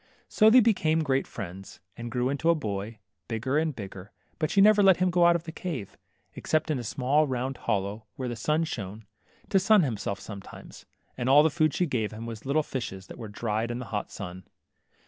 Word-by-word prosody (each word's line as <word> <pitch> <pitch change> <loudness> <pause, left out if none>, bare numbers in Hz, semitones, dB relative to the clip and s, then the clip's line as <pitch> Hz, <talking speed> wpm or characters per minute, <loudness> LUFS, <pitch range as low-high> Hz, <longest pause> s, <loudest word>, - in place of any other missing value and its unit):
.So 215 - +5
they 250 +3 +8
became 165 -8 +2
great 135 -2 0
friends, 95 +1 -8 0.2
and 120 0 -7
he - - -5
grew 125 +2 0
into 140 +4 0
a 170 - +5
boy, 105 -4 -4 0.3
bigger 125 +6 0
and 160 -3 -1
bigger, 95 -2 -9 0.3
but 155 -2 0
she - - +2
never 210 +1 +7
let 190 -3 +6
him 185 0 +2
go 175 0 +5
out 170 - +5
of 170 - -2
the 165 - -7
cave, 155 - -5 0.4
except 155 0 -1
into 135 -5 -1
a - - -8
small 140 +6 +1
round 130 0 -2
holl©w, 100 +2 -1
where 130 - -4
the 120 - -3
sun 150 +8 0
shone, 105 - -6 0.4
to 195 - +4
sun 205 0 +5
himself 105 -6 -3
sometimes; 100 -3 -11 0.3
and 125 +1 0
all 145 +2 +7
the 160 - +3
food 155 -1 +1
she 180 - +2
gave 115 -9 -1
him 110 +1 -7
was 115 +1 -7
little 155 +3 +2
fishes 95 -9 -5
that - - -11
were 115 - -6
dried 110 +2 -2
in 120 - -3
th 125 -4 -7
hot - - -3
sun. 90 0 -8
130 Hz, 220 wpm, -27 LUFS, 110-160 Hz, 0.4 s, they